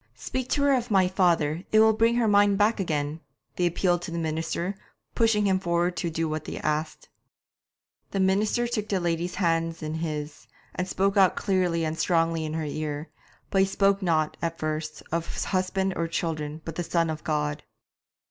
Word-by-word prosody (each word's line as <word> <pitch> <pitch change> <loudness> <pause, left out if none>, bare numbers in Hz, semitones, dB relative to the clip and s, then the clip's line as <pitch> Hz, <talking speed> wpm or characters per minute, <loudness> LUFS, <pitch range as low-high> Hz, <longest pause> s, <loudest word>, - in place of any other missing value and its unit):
'Speak 255 - -4
to 285 - +1
her 285 -1 +4
of 250 -2 0
my 190 -3 +4
father 170 -3 +1
it 215 - +5
will 220 0 +6
bring 230 +2 +3
her 240 -2 +2
mind 205 -1 +4
back 215 +2 +2
again,' 150 -4 -1 0.4
they 180 - +2
appealed 175 0 +1
to 175 - -6
the 170 - -4
minister, 165 +3 -2 0.4
pushing 225 -3 +2
him 190 -1 +2
forward 175 0 0
to 170 - -2
do 165 0 -1
what 155 0 -3
they - - -5
asked. 155 +1 -2 1.0
The 195 - -2
minister 205 +5 +2
took 230 -3 -3
the 195 - +1
lady's 175 0 -1
hands 165 -2 0
in 155 0 -3
his, 155 -2 -4 0.3
and 185 0 -2
spoke 195 +2 0
out 190 -2 +5
clearly 180 -4 +1
and 155 +1 -3
strongly 165 -2 +1
in 155 0 -4
her 160 -1 -2
ear; 150 +1 -4 0.4
but 195 - +3
he 190 - +3
spoke 195 +1 +2
not, 160 -4 +1
at 165 0 -2
first, 155 0 -4
of 170 0 -2
husband 190 0 0
or 165 - -1
children, 155 -2 -3
but 165 - -4
of - - 0
the - - -14
Son 165 -2 +2
of 155 0 -6
God. 150 -1 -1
170 Hz, 195 wpm, -26 LUFS, 160-195 Hz, 1.0 s, will